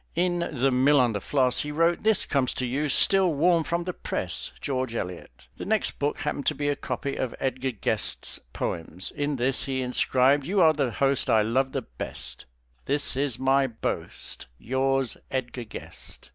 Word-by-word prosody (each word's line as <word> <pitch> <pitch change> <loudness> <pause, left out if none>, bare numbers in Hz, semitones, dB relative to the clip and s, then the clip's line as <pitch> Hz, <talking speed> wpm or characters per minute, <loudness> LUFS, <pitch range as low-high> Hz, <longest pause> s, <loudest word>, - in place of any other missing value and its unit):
In 175 +1 +1
"The 135 -5 0
Mill 135 +3 +4
on 120 -3 +3
the 100 - -3
Floss" 130 -3 +2
he 150 - -3
wrote 165 +3 +2
"This 220 -1 +3
comes 135 -3 +1
to 130 - -2
you 140 +5 -1
still 190 +5 +4
warm 165 +2 +3
from 170 +3 -1
the 180 +1 -4
press, - - -3
George 130 -3 -2
Eliot." 85 - -6
The - - -6
next 215 0 0
book 145 +1 -1
happened 140 - -2
to - - +2
be 145 0 -1
a 145 - +1
copy 140 0 -4
of 130 - -2
Edgar 130 0 -1
Guest's 115 -6 -1
poems. 85 +6 -4
In 145 0 -2
this 130 +1 0
he 130 -1 -1
inscribed 130 +2 +3
"You 195 +2 +1
are 160 -3 +6
the 140 -4 0
host 135 +4 +1
I 110 -1 +5
love 130 +5 +1
the 135 - -2
best, 60 - -8 0.4
This 140 -1 -1
is 135 -3 0
my 135 +1 +3
boast, 115 - -4
Yours, 130 - 0
Edgar 125 -2 -3
Guest." 105 - -11
135 Hz, 185 wpm, -26 LUFS, 125-145 Hz, 0.4 s, are